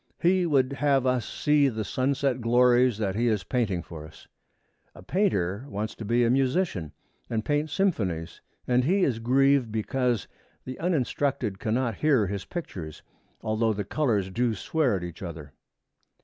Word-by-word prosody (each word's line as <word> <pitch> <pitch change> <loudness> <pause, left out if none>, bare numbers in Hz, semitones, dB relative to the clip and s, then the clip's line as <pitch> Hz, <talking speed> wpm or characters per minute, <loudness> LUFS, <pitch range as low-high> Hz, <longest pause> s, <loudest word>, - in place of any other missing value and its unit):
He 180 0 +3
would 135 -3 +2
have 140 -2 +2
us 125 -3 0
see 150 -2 +2
the 110 -3 -3
sunset 130 +2 0
glories 120 0 +4
that 100 -3 -1
he 115 +4 0
is 105 -4 +1
painting 105 -9 -1
for 80 -3 -9
us. 80 - -17 0.7
A - - -12
painter 105 - 0
wants 105 +2 -3
to - - -9
be 120 +3 +2
a 115 - +3
musician 130 - 0 0.4
and 110 -2 -2
paint 150 +1 0
symphonies, 95 - -1 0.3
and 125 0 +3
he 185 +7 +2
is 120 -8 +1
grieved 135 0 +3
because 120 +1 -1 0.4
the 130 0 -7
uninstructed 135 - -1
cannot 115 0 -1
hear 140 -8 +3
his 100 0 -4
pictures, 90 - -7 0.4
although 110 0 +1
the 105 0 -3
colors 105 -5 0
do 120 +2 0
swear 140 +1 0
at 90 - -4
each 85 -2 -8
other. 80 -6 -8
120 Hz, 160 wpm, -26 LUFS, 100-140 Hz, 0.7 s, glories